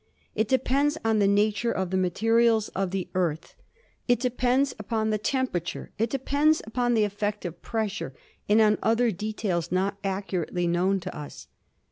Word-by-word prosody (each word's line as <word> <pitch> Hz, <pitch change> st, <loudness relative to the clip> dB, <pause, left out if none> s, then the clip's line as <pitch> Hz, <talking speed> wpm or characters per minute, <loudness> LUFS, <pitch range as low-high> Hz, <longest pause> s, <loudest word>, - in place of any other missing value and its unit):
It 220 Hz, -, 0 dB
depends 275 Hz, +4 st, +2 dB
on 220 Hz, -1 st, +3 dB
the 200 Hz, -, +4 dB
nature 210 Hz, +3 st, +2 dB
of 190 Hz, -1 st, -2 dB
the -, -, 0 dB
materials 225 Hz, +4 st, +2 dB
of 195 Hz, -1 st, -2 dB
the 190 Hz, 0 st, -3 dB
Earth; 170 Hz, -4 st, -1 dB, 0.5 s
it 245 Hz, -2 st, +3 dB
depends 250 Hz, +2 st, +1 dB
upon 220 Hz, +1 st, -1 dB
the 215 Hz, -, 0 dB
temperature; 210 Hz, -, -2 dB
it 225 Hz, +1 st, +1 dB
depends 285 Hz, +4 st, +2 dB
upon 240 Hz, +2 st, 0 dB
the 220 Hz, -, +3 dB
effect 205 Hz, 0 st, -2 dB
of 170 Hz, -1 st, -6 dB
pressure 215 Hz, -, -3 dB, 0.4 s
and 210 Hz, +2 st, +5 dB
on 210 Hz, -1 st, +4 dB
other 230 Hz, +1 st, +2 dB
details 195 Hz, -4 st, -2 dB
not 195 Hz, +2 st, 0 dB
accurately 190 Hz, -3 st, -2 dB
known 180 Hz, +3 st, +1 dB
to 185 Hz, -, -6 dB
us. 150 Hz, -1 st, -8 dB
210 Hz, 160 wpm, -26 LUFS, 190-235 Hz, 0.5 s, and